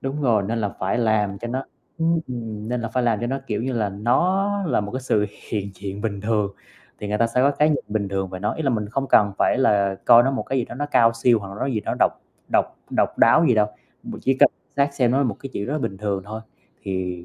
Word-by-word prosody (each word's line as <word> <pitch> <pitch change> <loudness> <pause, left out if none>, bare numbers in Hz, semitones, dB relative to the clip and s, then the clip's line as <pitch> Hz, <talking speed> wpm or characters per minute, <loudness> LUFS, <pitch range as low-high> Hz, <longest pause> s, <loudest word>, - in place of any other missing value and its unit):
Đúng 140 +2 -3
rồi, 115 -6 +3
nên 110 +4 -2
là 105 - 0
phải 95 +5 0
làm 105 -4 +1
cho 120 - -5
nó 130 +3 -3 0.3
ưm, 165 +1 +2
ừm, 110 -4 -6
nên 125 0 -1
là 115 - -3
phải 125 +3 -1
làm 115 -3 +1
cho 120 - -1
nó, 135 +3 -2
kiểu 105 -2 -2
như 130 +2 -2
là, 110 -4 0
nó 170 - +1 0.2
là 130 -9 +1
một 105 +1 -6
cái 130 - -3
sự 105 -5 +1 0.2
hiện 100 -2 -2
diện 100 +1 -6
bình 100 -2 -3
thường 105 -2 0 0.4
thì 105 - -5
người 105 +1 -1
ta 115 - +3
sẽ 115 +2 0
có 140 +2 +4
cái 150 +1 +2
nhìn 150 - 0
bình 105 -2 -1
thường 95 -1 -2
về 95 - -6
nó, 105 +2 -1
ý 160 - -4
là 135 - +1
mình 105 -4 -2
không 135 +5 -2
cần 100 -2 +4
phải - - +2
là 100 -6 +2
coi 120 -1 +8
nó 135 - +1
một 135 - -2
cái 135 - -2
gì 120 - 0
đó - - -9
nó 145 +3 -3
cao 115 -5 +4
siêu, 115 0 +3
hoặc 100 -2 -8
là 100 - -8
nó - - 0
gì 120 -6 -1
đó - - -3
độc - - +4 0.4
độc - - +4 0.3
độc - - 0
đáo 165 - +6
gì 125 - +4
đâu, 105 -1 +3 0.4
b - - -7
chỉ 135 - +2
cần - - +6 0.3
xác 140 0 +1
xem 125 -4 +2
nó 130 - +2
là 140 - +2
một 115 -6 -1
cái 135 - -7
chuyện 100 - -3
rất 135 - -3
là 155 - 0
bình 100 -8 -3
thường 100 -2 -2
thôi, 110 +2 -6 0.4
thì 90 -2 -4
115 Hz, 285 wpm, -23 LUFS, 100-130 Hz, 0.4 s, coi